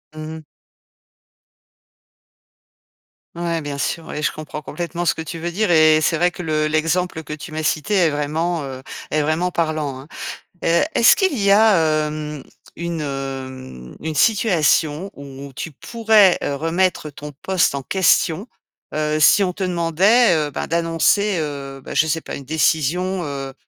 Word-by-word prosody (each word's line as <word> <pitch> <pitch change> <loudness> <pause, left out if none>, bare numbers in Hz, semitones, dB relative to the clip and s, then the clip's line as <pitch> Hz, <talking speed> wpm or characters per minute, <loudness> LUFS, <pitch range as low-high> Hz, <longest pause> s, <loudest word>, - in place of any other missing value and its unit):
Mmh 155 0 -6
mh. 160 - -12 2.9
Ouais, 170 -1 -2
bien 145 -1 -5
sûr, 165 +3 -2
oui, 150 - -5
je - - +2
comprends 155 0 -7
complètement 175 +1 -4
ce - - +3
que - - -6
tu 160 +1 -6
veux 170 +1 -4
dire 210 +3 0
et 155 -2 +6
c'est 165 +2 +1
vrai 175 +2 +2
que 180 - -8
le 155 -2 0
l'exemple 160 +2 0
que 150 - -7
tu 150 0 -8
m'as 155 0 -3
cité 155 +6 -1
est 180 -5 +4
vraiment, 155 +3 -1
heu 130 -1 -7 0.3
est 155 - +2
vraiment 160 +4 0
parlant, 155 -5 -2
hein. 140 - -14 0.6
Heu, 170 +1 +3
est-ce 230 - +7
qu'il 380 -9 +1
y 200 -2 +3
a, 215 +1 +6 0.3
hem, 150 -2 -6 0.3
une, 170 -1 -3
hem, 130 - -6
une 160 0 -4
situation 170 -3 +2
où 140 0 -10
tu 155 +4 -6
pourrais, 215 - +3
heu, 140 - -1
remettre 165 +2 0
ton 150 +1 -9
poste 185 -6 +1
en 140 - -3
question, 190 - +2 0.5
heu, 155 0 0
si 200 +6 +6
on 185 - 0
te 195 - -4
demandait, 180 +6 +3
heu, - - -9
ben, - - -4
d'annoncer, 170 +4 +1
heu, 140 -3 -5
bah, - - -7
je - - +4
sais 160 +1 -1
pas, - - -7
une 140 - -9
décision, 160 +5 0
heu 135 -2 -5
160 Hz, 165 wpm, -20 LUFS, 150-180 Hz, 2.9 s, est-ce